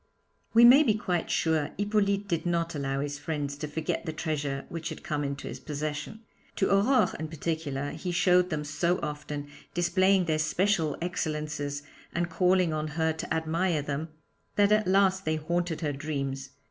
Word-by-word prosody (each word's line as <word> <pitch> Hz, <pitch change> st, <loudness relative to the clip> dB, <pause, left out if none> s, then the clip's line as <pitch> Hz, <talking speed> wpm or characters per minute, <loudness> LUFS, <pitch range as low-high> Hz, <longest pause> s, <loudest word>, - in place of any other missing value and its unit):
"' -, -, -42 dB
We 235 Hz, +1 st, +9 dB
may 255 Hz, +5 st, +9 dB
be 230 Hz, -9 st, +3 dB
quite 180 Hz, -5 st, -1 dB
sure 160 Hz, -3 st, +1 dB
Hippolyte 205 Hz, 0 st, +1 dB
did 170 Hz, -3 st, -1 dB
not 170 Hz, -1 st, 0 dB
allow 135 Hz, -2 st, -2 dB
his 145 Hz, 0 st, -4 dB
friends 145 Hz, -2 st, -3 dB
to 150 Hz, +1 st, -4 dB
forget 155 Hz, +2 st, -2 dB
the 165 Hz, -, -3 dB
treasure 145 Hz, -3 st, -3 dB
which 165 Hz, -1 st, -5 dB
had -, -, -8 dB
come 150 Hz, -1 st, -2 dB
into 140 Hz, 0 st, -4 dB
his -, -, -6 dB
possession. 150 Hz, +7 st, -4 dB, 0.3 s
To 195 Hz, -, +1 dB
Aurore, 220 Hz, +7 st, +4 dB
in 160 Hz, -, -3 dB
particular, 150 Hz, -3 st, -3 dB
he 180 Hz, -, -4 dB
showed 180 Hz, 0 st, +4 dB
them 155 Hz, -3 st, -2 dB
so 170 Hz, +5 st, 0 dB
often, 150 Hz, -1 st, -4 dB, 0.3 s
displaying 185 Hz, +2 st, +3 dB
their 155 Hz, -2 st, +1 dB
special 160 Hz, 0 st, +1 dB
excellences 150 Hz, -4 st, -3 dB, 0.3 s
and 175 Hz, 0 st, -1 dB
calling 180 Hz, -2 st, +3 dB
on 155 Hz, 0 st, -2 dB
her 160 Hz, +1 st, 0 dB
to 160 Hz, -, -7 dB
admire 160 Hz, 0 st, 0 dB
them, 145 Hz, +3 st, -3 dB, 0.5 s
that 205 Hz, 0 st, +4 dB
at 215 Hz, -2 st, +3 dB
last 190 Hz, 0 st, +3 dB
they 155 Hz, -2 st, 0 dB
haunted 170 Hz, +2 st, -1 dB
her 150 Hz, -3 st, -1 dB
dreams. 135 Hz, -2 st, -3 dB
160 Hz, 175 wpm, -28 LUFS, 150-180 Hz, 0.5 s, We